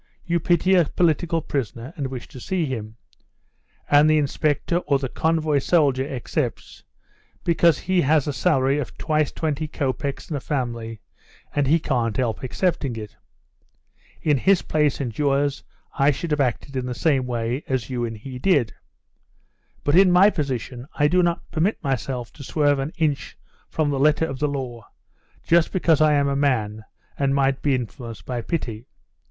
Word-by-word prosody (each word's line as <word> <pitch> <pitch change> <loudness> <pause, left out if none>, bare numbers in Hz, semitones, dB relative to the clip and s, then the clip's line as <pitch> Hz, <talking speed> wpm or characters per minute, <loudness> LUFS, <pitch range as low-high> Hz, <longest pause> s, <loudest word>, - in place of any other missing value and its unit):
You 170 0 +1
pity 175 +3 +2
a 175 -3 +5
political 165 +1 +1
prisoner 130 -1 -4
and 145 -5 -3
wish 130 -2 -7
to 130 - -10
see 180 +4 -1
him. 110 -5 -5 0.9
And 145 +1 +5
the 155 - +4
inspector 150 +3 0
or 145 -5 +1
the 135 -1 -3
convoy 155 +1 +1
soldier 140 -4 +2
accepts, 125 -1 -4 0.6
because 170 -2 +4
he 185 0 +1
has 150 -1 +3
a 145 - -1
salary 135 +2 +2
of 135 - -6
twice 155 -2 0
twenty 155 -1 -2
copecks 140 -2 -3
and 155 - -4
a - - -2
family, 120 -6 -4 0.5
and 145 -2 +1
he 155 +4 +5
can't 120 -8 -1
help 120 -4 -1
accepting 140 -2 -1
it. 105 -2 -8 1.1
In 150 -3 +3
his 190 +8 +3
place 150 -3 +1
and 120 -6 -3
yours 140 -1 0 0.3
I 140 +1 +3
should 155 +3 -2
have 150 -1 +2
acted 135 +2 -2
in 130 -1 -2
the 125 - -4
same 135 -3 +1
way 120 +3 -2
as 130 -1 -2
you 120 -1 -2
and 115 -1 -4
he 125 +4 -8
did. 140 - +2 1.1
But 145 - +2
in 185 0 +6
my 190 +4 +6
position 130 - -4
I 145 - +3
do 180 +4 +3
not 170 -1 0
permit 175 +7 +1
myself 130 -2 -3
to - - -11
swerve 145 0 +1
an 135 +3 -3
inch 155 -4 -1 0.3
from 155 -2 0
the 135 - -1
letter 150 +3 +3
of 135 -4 -6
the 150 - +1
law, 130 -5 -5 0.6
just 170 0 +3
because 165 -5 +2
I 155 -1 +5
am 140 -1 +2
a 140 - 0
man, 110 -7 0 0.3
and 140 -1 +2
might 135 -1 +1
be 140 -2 +2
influenced 115 -5 -6
by 120 +1 -3
pity. 115 -4 -4
140 Hz, 175 wpm, -23 LUFS, 125-155 Hz, 1.1 s, in